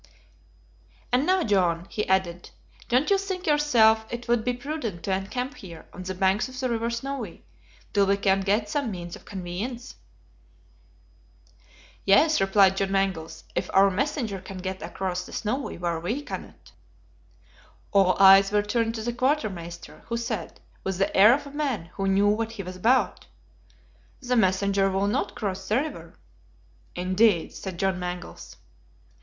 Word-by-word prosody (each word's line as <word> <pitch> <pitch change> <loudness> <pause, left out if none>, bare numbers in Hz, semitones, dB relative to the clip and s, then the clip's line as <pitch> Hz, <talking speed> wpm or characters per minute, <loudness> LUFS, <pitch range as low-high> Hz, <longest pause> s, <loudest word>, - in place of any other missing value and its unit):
"And 255 +4 +2
now, 375 -1 +3
John," 175 - +1
he 210 - -2
added, 180 -2 0 0.4
"don't 255 +9 +2
you 395 - +4
think 380 -2 -4
yourself 240 -8 +4
it 240 0 -6
would 235 -1 +2
be 250 - 0
prudent 245 - -5
to 195 - -1
encamp 250 +9 -3
here, 170 -4 -11
on - - -8
the 185 0 -5
banks 190 +6 +1
of 255 0 -9
the 255 -1 -1
river 230 0 -1
Snowy, 235 -4 -5 0.5
till 200 -1 +3
we 200 0 +3
can 195 -1 +2
get 205 +2 +1
some 280 +2 -1
means 175 -3 -6
of - - -15
conveyance." 205 +7 -6 2.1
"Yes," 300 +10 +4
replied 195 0 +4
John 195 0 0
Mangles, 190 -5 -1
"if - - -2
our 195 +1 +6
messenger 230 -3 -2
can 190 0 -9
get 190 +1 -5
across 180 -1 -3
the - - -12
Snowy 255 +6 -3
when 170 -2 -2
we 230 - -3
cannot." - - -9 1.2
All 195 -2 +4
eyes 195 0 +8
were 205 0 +2
turned 225 +2 -1
on 220 - -5
the 240 - -1
quartermaster, 215 - -2
who 235 - -2
said, 225 -6 -4 0.2
with 190 -1 -2
the 195 - 0
air 210 +5 +8
of 285 +1 -6
a 280 - -9
man 270 - -3
who 195 - -2
knew 195 +1 +3
what 225 +2 0
he 205 -3 -6
was 185 0 -7
about: 240 +7 +1 0.9
"The 250 -2 -1
messenger 195 -1 +2
will 195 +1 0
not 205 - -1
cross 195 -2 -4
the 215 - +1
river." 255 - -4 0.8
"Indeed!" 185 0 +2
said 190 -3 -7
John 190 0 0
Mangles. 180 0 -7
200 Hz, 160 wpm, -26 LUFS, 190-240 Hz, 2.1 s, eyes